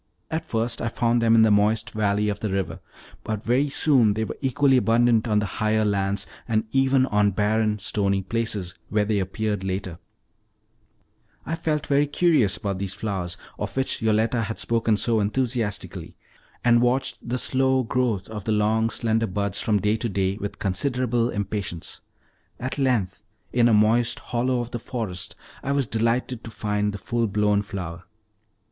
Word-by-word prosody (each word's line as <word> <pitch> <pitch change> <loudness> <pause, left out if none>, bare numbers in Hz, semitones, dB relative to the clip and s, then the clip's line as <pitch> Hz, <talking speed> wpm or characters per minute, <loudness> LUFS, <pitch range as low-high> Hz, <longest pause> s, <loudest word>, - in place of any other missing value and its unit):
At 160 +1 -3
first 115 +1 -1
I - - -1
found 120 0 +1
them 115 0 +4
in 110 - +6
the 110 - +4
moist 105 +2 +2
valley 105 -1 +1
of 100 0 -3
the 110 - -2
river, 95 -2 -2 0.4
but 110 -1 -3
very 130 +5 +2
soon 130 -8 +3
they 110 - 0
were - - -4
equally 135 0 +3
abundant 115 -1 +3
on 105 -2 +2
the 105 - +1 0.2
higher 110 0 +2
lands, 100 0 +1 0.2
and 110 -2 +1
even 135 -1 +3
on 105 -4 +2
barren, 105 +2 +1
stony 100 -1 0
places, 105 -4 -2 0.2
where 105 -1 +1
they 105 -1 +1
appeared 105 +1 -2
latest. 95 -2 -3 1.5
I 165 - -2
felt 155 -3 -1
very 145 +1 +2
curious 145 - +2
about 100 -3 -3
these 95 -1 -3
flowers, 95 -4 -3 0.2
of 105 +3 -4
which 135 - 0
Yoletta 110 +2 +2
had 110 +1 -3
spoken 115 -2 +1
so 115 +1 +1
enthusiastically, 115 0 -2 0.5
and 120 -1 +5
watched 125 0 0
the 125 - 0
slow 130 0 +2
growth 115 -5 -1
of 105 -3 -7
the 110 - 0
long, 110 +1 +2
slender 115 -1 0
buds 100 +1 -1
from 105 -2 +2
day 105 +3 +1
to 115 - -2
day 95 -1 0
with 100 -1 -5
considerable 120 +4 0
impatience. 100 -5 -4 0.6
At 130 +3 -4
length, 125 -9 0 0.3
in 120 -1 +4
a 115 - +4
moist 110 +3 +3
hollow 125 +1 -1
of 120 0 -6
the 120 - -3
forest, 110 -7 -4 0.3
I 140 - -2
was 140 -2 +1
delighted 115 +2 -1
to - - -7
find 105 -1 -1
the 100 - -6
full 115 +2 -1
blown 105 0 +2
flower. 90 -5 -6
110 Hz, 170 wpm, -24 LUFS, 105-120 Hz, 1.5 s, in